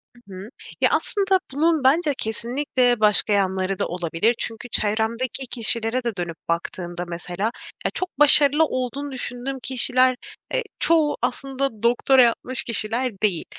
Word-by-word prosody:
Hı 240 -5 -16
hı. 190 +3 -9 0.3
Ya, - - +4
aslında 390 -2 +1
bunun 315 +1 +1
bence 295 +3 +3
kesinlikle 245 +1 0
başka 210 0 +3
yanları 190 -1 0
da - - 0
olabilir. 175 +6 0
Çünkü 230 +2 -4
çevremdeki 230 +5 -1
kişilere 230 +1 +1
de 235 -3 -3
dönüp 175 -2 -5
baktığımda 175 +1 -3
mesela 175 +5 -4 0.3
ya, - - +1
çok 370 -6 -4
başarılı 295 +1 +6
olduğunu 270 +1 -4
düşündüğüm 260 +1 -5
kişiler, 255 0 +3 0.4
eee, - - 0 0.2
çoğu 320 -3 +3
aslında 270 -4 -3
doktora 245 +3 +4
yapmış 245 +1 +1
kişiler 230 -1 -2
değil 195 -6 0
240 Hz, 135 wpm, -22 LUFS, 210-270 Hz, 0.4 s, başarılı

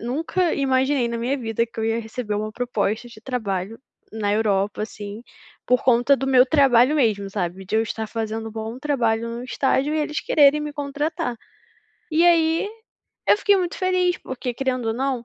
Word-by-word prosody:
nunca 320 - -1
imaginei 265 -2 +1
na 235 - -3
minha 260 +4 -1
vida 230 -1 -1
que 230 - -16
eu - - -1
ia 225 +1 0
receber 225 -1 -5
uma 215 +1 -3
proposta 235 -1 -2
de 215 -2 -14
trabalho 220 -4 -3 0.3
na 205 -2 -1
Europa, 210 -1 0
assim, 210 0 -7 0.4
por 250 0 +3
conta 250 +2 +4
do 270 +1 -3
meu 255 -1 +6
trabalho 265 -1 +4
mesmo, 210 -7 +1
sabe, 190 -1 -3
de 215 - 0
eu 220 - +3
estar 220 0 -4
fazendo 225 0 -4
um - - -9
bom 225 +2 -5
trabalho 230 -6 0
no 235 +1 -6
estágio 270 +3 0
e 315 - +1
eles 300 0 -1
quererem 295 0 +4
me 300 0 -4
contratar. 290 -3 -3 0.7
E 325 +2 +3
aí, 330 +3 +3 0.6
eu - - +7
fiquei 405 -1 +4
muito 355 -2 -2
feliz, 365 -1 +1
porque, 250 -1 -5
querendo 255 -3 -2
ou - - +1
não, 255 -1 -2
245 Hz, 185 wpm, -23 LUFS, 220-285 Hz, 0.7 s, eu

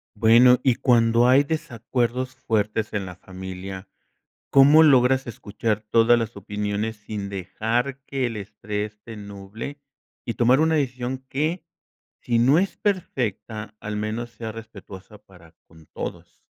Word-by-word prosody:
Bueno, 120 +4 +6
y 130 - +4
cuando 115 -1 +3
hay 135 +3 +5
desacuerdos 130 -4 -2
fuertes 110 -3 -1
en 100 -2 -2
la 90 - -8
familia, 95 +1 -8 0.6
¿cómo 145 +4 +7
logras 130 -3 +4
escuchar 105 -1 -3
todas 115 +1 +5
las 115 -1 -4
opiniones 105 +2 -3
sin 105 -1 -6
dejar 115 +8 -2
que 135 -2 -2
el 115 -2 -4
estrés 105 +1 -5
te 115 -1 -10
nuble 100 +7 -8 0.5
y 115 - -2
tomar 125 +4 +4
una 160 0 +3
decisión 130 -2 -2
que, 155 +5 -1 0.6
sí 120 -1 +1
no 130 +7 +5
es 195 +2 -1
perfecta 115 - -3
al 105 0 -5
menos 110 +3 -3
sea 115 -1 -7
respetuosa 105 -2 -11
para 90 -5 -19
con 80 -1 -18
todos. - - -8
115 Hz, 140 wpm, -24 LUFS, 105-130 Hz, 0.6 s, cómo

